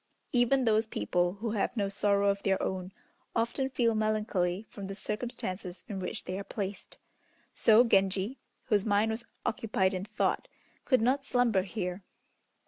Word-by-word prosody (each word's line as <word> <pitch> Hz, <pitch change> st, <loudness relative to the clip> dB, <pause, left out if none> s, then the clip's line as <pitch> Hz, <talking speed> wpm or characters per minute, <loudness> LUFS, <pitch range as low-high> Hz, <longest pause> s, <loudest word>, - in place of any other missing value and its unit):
Even 250 Hz, +1 st, +3 dB
those 220 Hz, 0 st, +3 dB
people 175 Hz, -, 0 dB
who 215 Hz, +3 st, -4 dB
have 215 Hz, +3 st, -1 dB
no 200 Hz, -2 st, +1 dB
sorrow 200 Hz, 0 st, +2 dB
of 200 Hz, 0 st, 0 dB
their 195 Hz, -1 st, +1 dB
own 185 Hz, 0 st, -3 dB, 0.4 s
often 240 Hz, +4 st, 0 dB
feel 235 Hz, -3 st, +2 dB
melancholy 215 Hz, -3 st, 0 dB
from 200 Hz, -2 st, -8 dB
the 195 Hz, -, -5 dB
circumstances 195 Hz, -4 st, -4 dB
in 200 Hz, -4 st, -4 dB
which 180 Hz, -, -4 dB
they 185 Hz, +2 st, -4 dB
are -, -, -4 dB
placed. 200 Hz, -1 st, -5 dB, 0.6 s
So 225 Hz, +1 st, +6 dB
Genji, 195 Hz, +2 st, +2 dB, 0.2 s
whose 210 Hz, -5 st, +2 dB
mind 210 Hz, +1 st, +2 dB
was 225 Hz, +1 st, -3 dB, 0.2 s
occupied 205 Hz, -4 st, +1 dB
in 185 Hz, 0 st, -2 dB
thought, -, -, 0 dB, 0.4 s
could 255 Hz, -5 st, +3 dB
not 270 Hz, +3 st, +2 dB
slumber 245 Hz, -7 st, +2 dB
here. 185 Hz, -1 st, -4 dB
205 Hz, 155 wpm, -30 LUFS, 190-230 Hz, 0.6 s, So